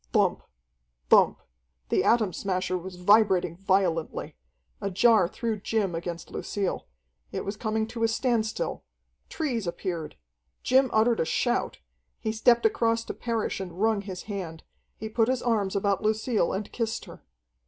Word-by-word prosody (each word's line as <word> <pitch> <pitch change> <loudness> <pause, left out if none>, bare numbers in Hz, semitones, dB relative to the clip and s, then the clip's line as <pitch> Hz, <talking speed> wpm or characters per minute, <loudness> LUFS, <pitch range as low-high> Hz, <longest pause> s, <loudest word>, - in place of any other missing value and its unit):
Thump, - - +2 0.7
thump! - - +5 0.5
The - - +2
Atom 220 -6 +3
Smasher 185 -1 -1
was 180 +1 -6
vibrating 185 -2 +4
violently. 185 -3 0 0.5
A 200 - -1
jar 205 0 +4
threw 225 +2 -3
Jim 205 -3 -1
against 170 0 -5
Lucille. 200 -3 -3 0.4
It - - -4
was 200 - -3
coming 220 0 -1
to 230 0 -6
a - - +5
standstill. 230 - -1 0.5
Trees 245 - -2
appeared. 170 -2 -4 0.5
Jim 260 +1 +4
uttered 225 +1 +3
a - - +2
shout. 240 +9 0 0.4
He 220 - -2
stepped 235 - +3
across 230 - +2
to - - -4
Parrish 230 -4 -2
and 180 -2 -7
wrung 220 -1 +2
his 190 -3 -7
hand. 180 -6 -6 0.3
He 220 - -5
put 225 +1 +1
his 255 -1 0
arms 210 -5 0
about 200 -1 +1
Lucille 215 -2 +1
and 200 +2 -4
kissed 230 -1 -2
her. - - -12
215 Hz, 150 wpm, -27 LUFS, 185-230 Hz, 0.7 s, thump